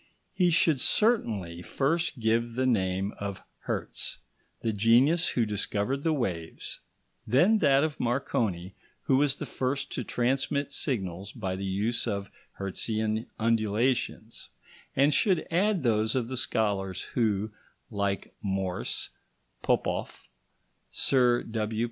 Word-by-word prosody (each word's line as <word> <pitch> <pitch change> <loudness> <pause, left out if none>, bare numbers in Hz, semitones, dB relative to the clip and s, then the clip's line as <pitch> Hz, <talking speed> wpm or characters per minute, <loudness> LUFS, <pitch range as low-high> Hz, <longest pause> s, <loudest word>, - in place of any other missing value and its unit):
he 180 -2 +3
should 160 -4 +3
certainly 105 - +1
first 145 - -1
give 115 +1 +1
the 130 +1 +1
name 95 -4 +1
of 100 -1 -5 0.2
Hertz, - - -2 0.4
the 115 - 0
genius 120 - +4
who 120 - +1
discovered 105 +5 -1
the 160 - +1
waves, 90 - -3 0.5
then 175 - +4
that 140 -4 +4
of 155 -2 -2
Marconi, 110 -7 -1 0.3
who 130 - +3
was 140 -1 +3
the - - -5
first 135 +2 -2
to 125 - -3
transmit 135 +5 0
signals 95 - -1
by 95 -5 -3
the 95 +1 -4
use 100 +5 -1
of 100 -1 -3 0.3
Hertzian 110 +3 -1
undulations, 115 +1 0 0.5
and 140 +2 +4
should 180 +3 +2
add 190 +1 +2
those 110 -1 +2
of 125 -2 -1
the 130 - -3
scholars 100 -6 0
who, 110 -3 +1 0.4
like 100 -2 -2
Morse, 95 -9 -2 0.5
Popoff, - - -1 0.6
Sir 125 -3 +3
W. 110 -1 -3
115 Hz, 125 wpm, -28 LUFS, 100-135 Hz, 0.6 s, genius